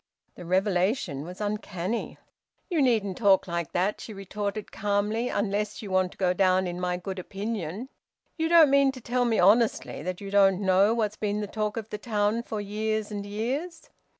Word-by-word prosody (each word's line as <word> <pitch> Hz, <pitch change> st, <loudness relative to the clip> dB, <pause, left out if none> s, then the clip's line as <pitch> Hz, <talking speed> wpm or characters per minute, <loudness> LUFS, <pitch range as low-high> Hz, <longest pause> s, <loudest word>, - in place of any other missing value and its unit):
The 175 Hz, -, -10 dB
revelation 185 Hz, -, +1 dB
was 180 Hz, +2 st, -9 dB
uncanny. 205 Hz, 0 st, -3 dB, 0.5 s
"You 330 Hz, -4 st, +2 dB
needn't 220 Hz, -8 st, +1 dB
talk 200 Hz, -3 st, +4 dB
like 170 Hz, -3 st, -3 dB
that," 190 Hz, +4 st, 0 dB
she 215 Hz, -, -8 dB
retorted 200 Hz, +2 st, -4 dB
calmly, 210 Hz, +4 st, 0 dB
"unless 205 Hz, +1 st, -2 dB
you 200 Hz, -, -7 dB
want 185 Hz, -1 st, +2 dB
to -, -, -24 dB
go 180 Hz, -2 st, +2 dB
down 185 Hz, 0 st, +3 dB
in 175 Hz, 0 st, -4 dB
my 180 Hz, 0 st, -1 dB
good 190 Hz, +1 st, -6 dB
opinion. 200 Hz, +2 st, -4 dB, 0.5 s
You 320 Hz, -1 st, -1 dB
don't 330 Hz, -4 st, +7 dB
mean 275 Hz, -1 st, +5 dB
to 260 Hz, -, -9 dB
tell 245 Hz, +1 st, 0 dB
me 230 Hz, -2 st, +1 dB
honestly 215 Hz, +1 st, +3 dB
that 180 Hz, +3 st, -4 dB
you 200 Hz, -1 st, -7 dB
don't 195 Hz, -2 st, +4 dB
know 195 Hz, +3 st, +3 dB
what's 215 Hz, -2 st, -1 dB
been 210 Hz, -1 st, -1 dB
the 210 Hz, -, -2 dB
talk 210 Hz, +1 st, -3 dB
of 225 Hz, -1 st, -6 dB
the 210 Hz, -, -4 dB
town 210 Hz, 0 st, 0 dB
for 220 Hz, -3 st, -5 dB
years 215 Hz, +1 st, -2 dB
and 205 Hz, -1 st, -5 dB
years!" 265 Hz, -, -4 dB
205 Hz, 185 wpm, -27 LUFS, 190-225 Hz, 0.5 s, don't